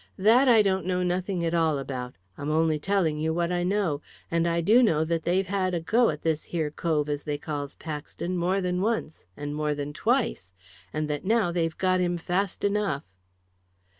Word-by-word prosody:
"That 225 Hz, +7 st, +5 dB
I 225 Hz, -4 st, +6 dB
don't 190 Hz, -3 st, 0 dB
know 180 Hz, -1 st, +1 dB
nothing 180 Hz, 0 st, -1 dB
at 165 Hz, -, -1 dB
all 160 Hz, -3 st, +2 dB
about; 130 Hz, -2 st, -5 dB, 0.2 s
I'm 145 Hz, +6 st, -4 dB
only 155 Hz, 0 st, +2 dB
telling 170 Hz, -3 st, +1 dB
you 160 Hz, +1 st, 0 dB
what 170 Hz, 0 st, 0 dB
I 175 Hz, 0 st, 0 dB
know. 180 Hz, -5 st, 0 dB, 0.3 s
And 170 Hz, 0 st, +2 dB
I 170 Hz, 0 st, +1 dB
do 215 Hz, +9 st, +5 dB
know 160 Hz, -10 st, +3 dB
that 165 Hz, 0 st, -1 dB
they've 185 Hz, +3 st, +2 dB
had 185 Hz, -1 st, 0 dB
a -, -, 0 dB
go 225 Hz, +9 st, +3 dB
at -, -, -4 dB
this 160 Hz, -1 st, 0 dB
here 160 Hz, -4 st, -2 dB
cove 155 Hz, -2 st, 0 dB
as 145 Hz, -1 st, -2 dB
they 150 Hz, -1 st, -3 dB
calls 145 Hz, -1 st, -5 dB
Paxton 160 Hz, +3 st, -5 dB
more 180 Hz, +3 st, +1 dB
than 180 Hz, 0 st, -1 dB
once, 205 Hz, -, -2 dB
and 145 Hz, 0 st, -4 dB
more 150 Hz, 0 st, -1 dB
than 145 Hz, 0 st, -4 dB
twice, 60 Hz, -, 0 dB, 0.4 s
and 155 Hz, 0 st, -2 dB
that 150 Hz, -1 st, -3 dB
now 215 Hz, -3 st, +2 dB
they've 165 Hz, -2 st, -1 dB
got 185 Hz, -1 st, +2 dB
him 175 Hz, -1 st, 0 dB
fast 180 Hz, +3 st, -2 dB
enough." 200 Hz, -8 st, 0 dB
170 Hz, 200 wpm, -27 LUFS, 150-190 Hz, 0.4 s, I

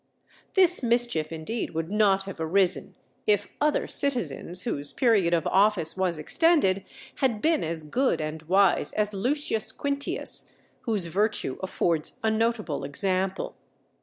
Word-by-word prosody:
This 360 Hz, -2 st, +5 dB
mischief 235 Hz, -10 st, 0 dB
indeed 165 Hz, +5 st, -5 dB
would 165 Hz, +2 st, -3 dB
not 200 Hz, -2 st, +2 dB
have 195 Hz, -3 st, -9 dB
arisen, 175 Hz, +3 st, +1 dB, 0.3 s
if 205 Hz, -2 st, +2 dB
other 300 Hz, 0 st, +1 dB
citizens 185 Hz, -, 0 dB
whose 145 Hz, -11 st, 0 dB
period 215 Hz, -9 st, +2 dB
of 165 Hz, -3 st, +1 dB
office 190 Hz, -4 st, +3 dB
was 185 Hz, -3 st, -1 dB
extended 195 Hz, -, +2 dB, 0.3 s
had 245 Hz, -6 st, 0 dB
been 320 Hz, +5 st, +1 dB
as 160 Hz, 0 st, 0 dB
good 255 Hz, -, 0 dB
and 155 Hz, 0 st, -5 dB
wise 195 Hz, 0 st, +3 dB
as 210 Hz, 0 st, 0 dB
Lucius 240 Hz, +2 st, 0 dB
Quintius, 280 Hz, 0 st, -1 dB, 0.3 s
whose 210 Hz, -6 st, +1 dB
virtue 200 Hz, -5 st, -1 dB
affords 170 Hz, -4 st, -1 dB
a 220 Hz, -, +2 dB
notable 220 Hz, -9 st, -1 dB
example. 185 Hz, +6 st, -2 dB
195 Hz, 135 wpm, -26 LUFS, 165-235 Hz, 0.3 s, This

